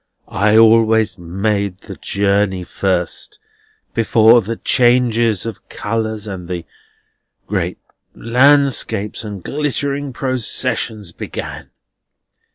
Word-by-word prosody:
I 105 +2 +2
always 110 -2 +4
made 100 +2 -2
the - - -9
journey 100 -2 0
first, 95 - -2 0.6
before 115 +1 +5
the 115 +3 -4
changes 120 -4 +2
of 115 -3 -8
colours 110 0 -3
and 95 -4 -7
the 85 -2 -4 0.8
great - - -2 0.4
landscapes 125 -4 +2
and 100 -4 -7
glittering 145 -1 -2
processions 120 - -2
began. - - -7
110 Hz, 90 wpm, -18 LUFS, 100-120 Hz, 0.8 s, before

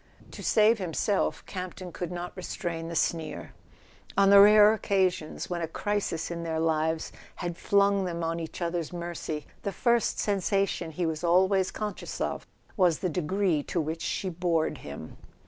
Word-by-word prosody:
" - - -22
To - - -9
save 220 +1 +4
himself 185 +2 -1
Campton 185 -1 -6
could 175 +1 -5
not 175 0 -5
restrain 170 -2 -4
the 170 - -5
sneer; 160 -1 -2 0.6
on 200 0 +5
the 200 - +9
rare 210 +1 +8
occasions 190 -7 0
when 175 -1 -3
a 165 - -1
crisis 200 -1 -2
in 170 0 -4
their 160 -1 -2
lives 160 0 0 0.4
flung 200 +2 +2
them 170 -1 -3
on 165 +1 -1
each 165 +2 -5
other's 170 -2 -2
mercy, 170 -3 -5 0.2
the 200 - -2
first 235 +2 +1
sensation 195 -3 0
he 170 +3 -2
was 160 0 -2
always 185 +2 +3
conscious 210 -3 -5
of - - -3 0.3
was 180 -6 +3
the 185 - -1
degree 180 0 0
to 170 - -3
which 160 +1 -3
she 195 - -2
bored 170 -2 0
him. 70 +2 -9
175 Hz, 165 wpm, -28 LUFS, 165-195 Hz, 0.6 s, the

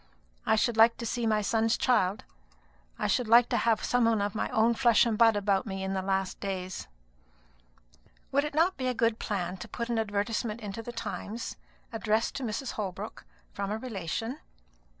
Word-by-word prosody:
I - - +5
should 225 +1 +1
like 230 +1 +6
to 235 - -5
see 230 0 -1
my 215 -1 +2
son's 225 +2 +2
child; 205 -5 +2 0.7
I - - -2
should 250 - +1
like 235 +2 +6
to - - +1
have 225 -2 +2
some 245 -1 +2
one 225 -2 +3
of 200 0 -1
my 215 - -2
own 225 +2 +3
flesh 235 -2 +4
and 230 -2 +1
blood 225 0 +5
about 200 0 +1
me 190 -1 -4
in 190 0 -2
my 190 - -1
last 190 0 -1
days." 185 -2 -4 1.4
"Would 280 +1 +3
it 295 -1 -4
not 340 +4 +3
be 255 - -2
a 250 - 0
good 230 -1 +1
plan 190 -3 -3
to 180 - -8
put 235 0 -5
an 235 -1 +1
advertisement 215 +1 -1
into 210 0 -6
the 240 - -7
Times, 230 -1 -5 0.4
addressed 225 0 0
to 275 - -4
Mrs. 240 +3 -3
Holbrook, 195 - -5 0.3
from 200 -1 -3
a 210 - -1
relation? 225 - -4
225 Hz, 190 wpm, -29 LUFS, 200-235 Hz, 1.4 s, like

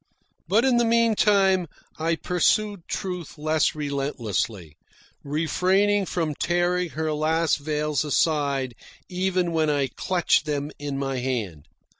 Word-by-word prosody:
But 215 +8 +3
in 255 -2 +3
the 240 - +4
meantime, 210 -5 +3 0.3
I 165 +1 +1
pursued 180 +3 0
Truth 180 -5 -5
less 155 +1 +1
relentlessly, 115 - -3 0.5
refraining 185 +7 +1
from 160 -4 -1
tearing 175 +3 0
her 155 +1 -2
last 160 +1 +1
veils 150 0 -1
aside 140 -4 0 0.4
even 180 -1 0
when 160 -2 +1
I 145 -2 +1
clutched 180 -3 +1
them 145 0 -2
in 145 -1 -4
my 135 -1 -2
hand. 110 - -3
160 Hz, 120 wpm, -24 LUFS, 140-180 Hz, 0.5 s, the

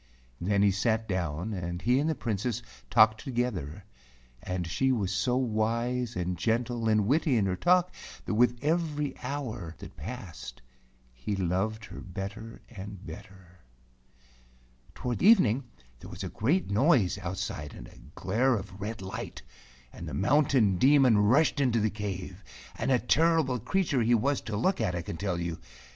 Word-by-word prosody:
Then 100 +2 +1
he 100 - +5
sat 110 +3 0
down, 90 +1 -2
and 85 -2 -4
he 125 +7 +2
and 150 +3 +1
the 160 - 0
Princess 115 +1 -2 0.3
talked 110 0 +5
together, 105 - -3 0.6
and 90 -1 -3
she 90 +11 +1
was 105 -7 0
so 125 +6 +1
wise 120 +1 -1
and 90 -1 -2
gentle 115 +2 0
and 105 -2 +3
witty 145 +2 +2
in 105 - +2
her 95 -1 0
talk 180 - +3 0.3
that - - -2
with 120 +2 +3
every 150 -3 0
hour 120 - -5
that - - -11
passed 60 0 -8 0.5
he 65 +12 -4
loved 95 +4 -1
her - - -10
better 100 +4 -7
and 100 -3 -9
better. 90 +2 -12 1.4
Toward 125 -2 -3
evening 140 - +5 0.3
there - - -11
was - - -7
a - - -3
great 145 - 0
noise 115 - +3
out¬ 95 -1 -4
side 75 -7 -5
and - - -10
a - - -16 0.2
glare 120 +8 +1
of 95 -2 -7
red 110 0 -5
light, 110 +5 -6 0.5
and - - -8
the - - -5
Mountain 125 -5 +3
Demon 130 -5 +5
rushed 135 +9 +3
into 120 -4 +2
the 110 -1 +1
cave, 95 -2 -6 0.3
and - - -2
a 130 - +5
terrible 150 0 +2
creature 160 - 0
he 120 +1 +4
was 135 +5 +1
to 105 -2 -4
look 185 - +1
at, 95 -5 0
I 85 - -3
can 80 - -6
tell 95 -3 -2
you. 85 -1 -3
110 Hz, 165 wpm, -29 LUFS, 95-125 Hz, 1.4 s, he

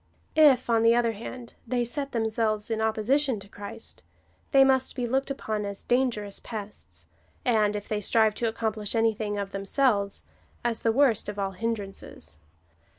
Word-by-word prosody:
If, 285 -5 +6
on 230 -1 +3
the 230 +1 +5
other 235 -1 +2
hand, 235 +2 -8
they 245 0 +1
set 275 +3 -4
them 225 -2 0
selves 215 -1 -1
in 220 0 0
opposition 225 +3 +1
to 195 - -13
Christ, 205 +3 -7 0.5
they 270 -2 +7
must 265 -1 +2
be 250 -2 -1
looked 265 +4 0
upon 215 -6 -3
as 200 -1 -5
dangerous 240 -5 0
pests, 200 - -8 0.4
and, 215 -4 +3
if 205 0 -5
they 210 -1 -2
strive 220 +1 +3
to 235 - +2
accomplish 220 -1 -2
anything 220 -2 +1
of 200 -1 -3
themselves, 200 0 0 0.4
as 230 -2 0
the 225 - +3
worst 245 -4 +3
of 205 - -6
all 195 -1 -1
hindrances. 195 - -5
225 Hz, 165 wpm, -27 LUFS, 205-240 Hz, 0.5 s, they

